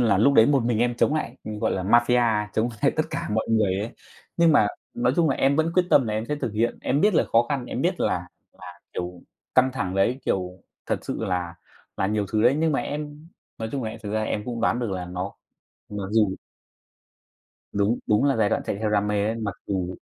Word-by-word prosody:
là 110 -6 +3
lúc 140 +7 +4
đấy 110 - +7
một 140 -3 +3
mình 120 -2 +1
em 120 +1 +1
chống 150 - +2
lại, 130 -5 -3
gọi 105 -1 -2
là, 95 - -2
mafia, 120 -1 +3
chống 110 +2 +1
lại - - +5
tất - - +3
cả - - -3
mọi 110 +1 0
người 105 -4 +2
ấy, 105 +3 -3 0.5
nhưng 170 -1 +5
mà 125 -8 +5 0.3
nói 120 +1 +1
chung 165 -2 +3
là - - 0
em 140 +1 +2
vẫn 160 +1 +2
quyết 180 - +4
tâm 135 -4 +5
là 105 - -2
em 110 +1 -2
sẽ 150 - -1
thực 125 -7 -3
hiện. 115 +2 0
Em 140 +3 +1
biết 210 +2 +3
là - - +4
khó 115 +1 +4
khăn, 135 -4 -2
em - - -3
biết - - 0
là - - 0 0.3
là, 90 -1 -11
kiểu, 90 0 -5 0.3
căng 130 0 +5
thẳng 95 -8 -3
đấy, 115 +7 +1
kiểu 90 -1 -2 0.2
thật - - 0
sự - - -3
là 90 -2 -2 0.4
là - - 0
nhiều 105 0 0
thứ 110 -1 +2
đấy, 125 +3 +5
nhưng 160 0 +2
mà - - +1
em 150 +2 -6 0.3
nói 110 - -3
chung 135 - -2
là 110 - -3
em 115 - -9
thực 105 -1 -5
ra 110 0 0
em 105 -1 -2
cũng 120 -1 -4
đoán 115 - +2
được 120 -4 -2
là 90 -2 -3
nó 90 +2 -4 0.6
mặc 105 -1 -4
dù 105 -4 +3 1.4
Đúng, 105 +4 +1
đúng 105 +5 +3
là 140 -1 +3
giai 110 -2 +3
đoạn - - 0
chạy - - -1
theo 110 +1 -1
đam 105 -1 +2
mê 105 -1 +1
đấy. 110 - 0
Mặc 110 -4 -3
dù 90 -2 -2
110 Hz, 245 wpm, -24 LUFS, 100-130 Hz, 1.4 s, đấy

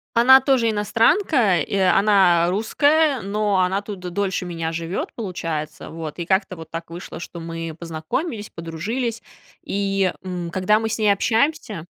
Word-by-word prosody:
Она 265 +3 +7
тоже 255 -4 +2
иностранка, 225 - +2
и 175 - -3
она, 190 -2 +4
э, - - +1
русская, 285 - +2
но 205 -1 0
она 190 +2 +1
тут 200 -2 -7
д 180 0 -6
дольше 190 -1 -2
меня 165 -2 -3
живёт, 165 +2 -4
получается. 165 -8 -5
Вот, 160 -2 -7
и 170 - -3
как-то 190 +1 0
вот 160 -2 -11
так 165 0 -6
вышло, 170 -1 -8
что 170 0 -8
мы 165 -1 -6
познакомились, 180 - -4
подружились. 210 +9 -4 0.4
И, 195 -1 0
м, 180 -2 -4
когда 190 +4 +2
мы 225 0 -2
с - - -2
ней 215 -2 +3
общаемся 225 - 0
195 Hz, 160 wpm, -22 LUFS, 170-220 Hz, 0.4 s, Она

